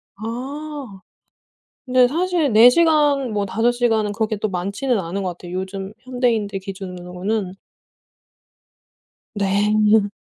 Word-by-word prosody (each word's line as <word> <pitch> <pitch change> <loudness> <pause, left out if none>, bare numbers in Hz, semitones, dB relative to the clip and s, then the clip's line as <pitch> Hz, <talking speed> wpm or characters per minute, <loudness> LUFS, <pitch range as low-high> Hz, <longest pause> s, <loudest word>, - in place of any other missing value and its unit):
아. 260 +1 -6 0.9
근데 255 0 +5
사실 335 -2 0
4 225 +3 +8
시간 295 -4 +3
뭐 205 -1 -1
5 230 +5 +1
시간은 225 -4 +1
그렇게 215 0 -1
또 210 +1 -2
많지는 200 +7 -1
않은 185 +3 -4
거 185 - -2
같아요 175 0 -10
요즘 190 +1 -5
현대인들 240 -6 -1
기준으로는. 185 +1 -5 1.8
네. 210 +1 +2
215 Hz, 210 characters per minute, -21 LUFS, 195-250 Hz, 1.8 s, 4